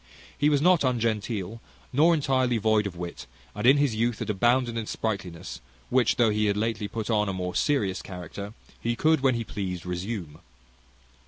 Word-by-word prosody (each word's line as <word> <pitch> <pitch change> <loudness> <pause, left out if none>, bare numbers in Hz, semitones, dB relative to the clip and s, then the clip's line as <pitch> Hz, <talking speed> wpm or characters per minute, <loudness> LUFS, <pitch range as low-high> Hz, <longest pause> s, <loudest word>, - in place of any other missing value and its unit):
He 145 - +2
was 145 -1 +2
not 180 -3 +5
ungenteel, 115 -4 -1 0.3
nor 160 +6 +5
entirely 130 -4 +1
devoid 110 -1 +2
of 95 - -8
wit, 85 0 -7 0.3
and 105 +4 -1
in 135 +2 +7
his 140 -4 +2
youth 115 +1 0
had - - -2
abounded 120 +3 +2
in 115 -2 -3
sprightliness, 95 - -4 0.3
which, 130 -2 +3
though 115 -3 +3
he 105 0 +1
had 100 0 +1
lately 110 -1 -1
put 110 +2 -4
on 105 -2 +2
a - - -2
more 90 -1 -3
serious 105 -10 +1
character, 100 +3 -8 0.2
he 120 0 -1
could, 160 +5 +3
when 130 -2 +3
he 115 - -2
pleased, 95 -5 -5
resume. 90 -3 -5
110 Hz, 180 wpm, -26 LUFS, 100-125 Hz, 0.3 s, in